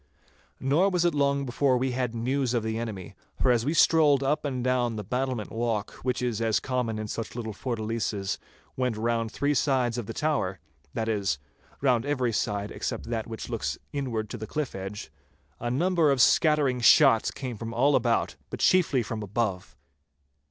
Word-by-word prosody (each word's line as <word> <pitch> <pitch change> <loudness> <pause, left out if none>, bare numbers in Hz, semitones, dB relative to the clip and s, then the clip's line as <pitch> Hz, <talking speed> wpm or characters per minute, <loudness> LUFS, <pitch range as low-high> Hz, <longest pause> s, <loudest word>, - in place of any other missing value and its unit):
Nor 150 +9 +3
was 180 -2 +1
it 170 - +3
long 140 -1 +1
before 130 +1 +2
we 130 +1 0
had 125 -2 -2
news 125 +2 0
of 115 - 0
the 110 0 -2
enemy, 105 -6 -6 0.3
for 130 - +4
as 120 -2 +2
we 155 +4 0
strolled 150 -5 +5
up 150 +3 0
and 130 -3 -2
down 125 -2 +1
the 105 - -4
battlement 125 0 -2
walk, 115 -3 -1
which 125 0 -1
as 115 -3 -1
is 110 -4 +2
common 125 -4 -2
in 110 0 -4
such 115 +2 -5
little 110 -3 -4
fortalices, 110 -4 -2 0.4
went 125 -4 -1
round 115 0 -1
three 145 +3 0
sides 125 -3 +1
of 110 - -6
the 115 - -5
tower—that 90 - -3
is, 100 -10 0 0.4
round 125 -4 +3
every 130 -5 0
side 100 +1 -1
except 115 - -4
that 115 -2 -2
which 115 -1 -6
looks - - -3 0.2
inward 120 -6 -2
to 120 - -4
the 110 -1 -6
cliff 150 +1 -3
edge—a 95 - -8
number 170 +4 +2
of 135 -2 +2
scattering 145 -2 +4
shots 125 -1 +6
came 125 -3 -5
from 115 +1 -6
all 135 +5 +3
about, 120 -2 +1
but - - -6
chiefly 155 -9 +3
from 110 0 -5
above. 100 - -2
120 Hz, 180 wpm, -27 LUFS, 110-135 Hz, 0.4 s, shots